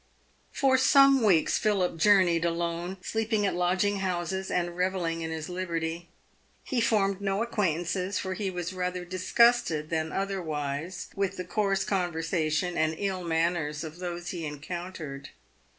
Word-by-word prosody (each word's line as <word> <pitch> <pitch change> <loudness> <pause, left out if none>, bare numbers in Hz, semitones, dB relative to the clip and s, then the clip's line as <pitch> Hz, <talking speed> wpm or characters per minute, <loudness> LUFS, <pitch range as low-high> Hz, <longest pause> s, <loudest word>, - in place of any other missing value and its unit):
Eor 265 -1 +4
some 275 0 +6
weeks 185 -8 +3
Philip 195 -5 +1
journeyed 180 -2 +4
alone, 170 +2 -2
sleeping 220 0 0
at 195 - +1
lodging 185 +3 +1
houses, 190 0 -2
and 175 -1 -1
revelling 180 -2 -1
in 160 - -3
his 160 -1 -4
liberty. 170 -2 -3 0.5
He 250 -3 -1
formed 200 -4 +2
no 195 +2 0
acquaintances, 185 -3 -1
for 190 -1 -2
he 195 0 -2
was 180 -1 -4
rather 180 -1 -3
disgusted 185 -3 +2
than 160 -1 -1
otherwise 170 -3 -3
with 195 -1 -1
the 180 - -4
coarse 195 0 0
conversation 175 -2 -1
and 160 0 +1
ill 190 -2 -2
manners 165 -2 0
of 160 +2 -8
those 175 -1 -5
he 175 -3 -5
encountered. 155 -1 -6
180 Hz, 140 wpm, -28 LUFS, 165-195 Hz, 0.5 s, some